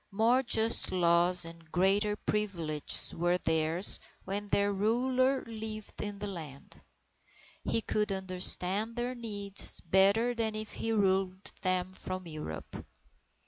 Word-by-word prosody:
More 225 +5 +2
just 230 -2 +4
laws 175 0 +2
and 165 -1 -13
greater 200 +3 +1
privileges 175 -9 -2
were 175 +1 0
theirs, 160 +2 +2 0.3
when 205 +2 -4
their 200 0 +1
ruler 255 +6 0
lived 220 -1 -7
in 205 -1 -5
the 205 - -6
land. 160 -8 -10 0.8
He 225 - 0
could 210 -1 -1
understand 190 +3 +3
their 245 +1 -3
needs 205 -5 +1
better 200 +7 +2
than 225 -2 -2
if 215 0 -5
he 225 - -4
ruled 190 -2 0
them 185 0 -1
from 185 0 -7
Europe. 155 - -8
200 Hz, 125 wpm, -30 LUFS, 180-220 Hz, 0.8 s, just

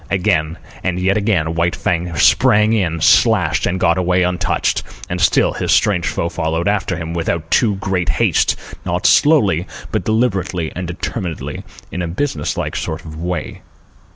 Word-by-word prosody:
Again, 85 -4 0 0.3
and 90 -1 -1
yet 95 +2 +1
again, 100 -7 0
White 85 +1 0
Fang 85 -1 -2
sprang 105 +7 +4
in, 85 -7 0
slashed, - - +3
and 95 +1 -1
got 85 0 +2
away 90 0 +2
untouched, 90 0 0 0.3
and 90 0 -3
still 90 - +3
his - - -2
strange 90 -5 +2
foe 85 - -1
followed 80 0 -2
after 100 -3 0
him, 85 0 -5
without 85 -1 -3
too 105 -4 +3
great 95 -3 -2
haste, - - +2 0.3
not - - -2
slowly, 100 - +4 0.2
but - - -1
deliberately 100 -7 0
and 90 0 -4
determinedly, 90 -1 -5 0.3
in 90 - -4
a 85 - -2
businesslike 85 - -3
sort 80 +1 -4
of 80 -1 -9
way. 90 -2 -4
90 Hz, 155 wpm, -18 LUFS, 85-95 Hz, 0.3 s, sprang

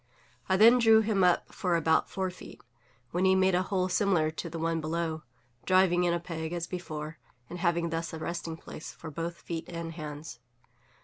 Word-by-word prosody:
I 190 - +4
then 230 +4 +7
drew 225 -2 +6
him 210 -3 +1
up 180 -1 +2
for 180 -4 0
about 160 -1 +2
four 190 -1 -2
feet, 180 - -12 0.5
when 175 +2 0
he 190 0 +5
made 190 0 +3
a 180 - +3
hole 185 -1 0
similar 180 -5 +2
to 170 +2 -6
the 165 - -6
one 165 0 -1
below, 160 0 -2 0.4
driving 185 -1 +4
in 175 - +2
a 170 - 0
peg 165 -1 -5
as 170 -1 -2
before, 155 -4 -6 0.3
and 175 - -6
having 170 -1 +1
thus 165 0 -3
a 160 - -6
resting 165 0 -4
place 155 - -9
for 160 - -9
both 170 +3 -4
feet 165 -1 -5
and 165 -1 -5
hands. 150 -4 -7
170 Hz, 195 wpm, -29 LUFS, 160-185 Hz, 0.5 s, then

